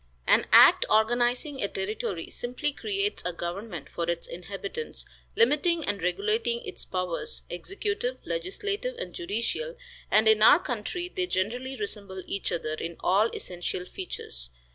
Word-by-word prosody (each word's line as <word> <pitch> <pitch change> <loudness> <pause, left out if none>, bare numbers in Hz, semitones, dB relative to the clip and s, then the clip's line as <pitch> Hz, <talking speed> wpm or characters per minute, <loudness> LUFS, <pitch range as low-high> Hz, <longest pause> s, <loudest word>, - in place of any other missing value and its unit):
An - - +4
act - - +9
organizing 240 +5 +2
a 200 - +1
territory 190 -3 -3
simply 250 +4 -2
creates 405 +5 -1
a 180 - -1
government 175 0 -5
for 170 0 -3
its 170 -1 -1
inhabitants, 205 - -6 0.3
limiting 340 -5 +3
and 205 -3 -1
regulating 440 - 0
its 390 - -6
powers, 180 -2 -2
executive, 415 - -2
legislative 425 +2 -2
and - - -5
judicial, 360 - -2 0.3
and 215 +1 +5
in 220 -1 +6
our 220 - +9
country 345 - -3
they 365 0 -2
generally 245 - -1
resemble 200 -3 -4
each 200 - -2
other 155 -2 -2
in 165 +2 -4
all 200 +5 +4
essential 180 0 -4
features. 65 - -5
235 Hz, 140 wpm, -28 LUFS, -, 0.3 s, act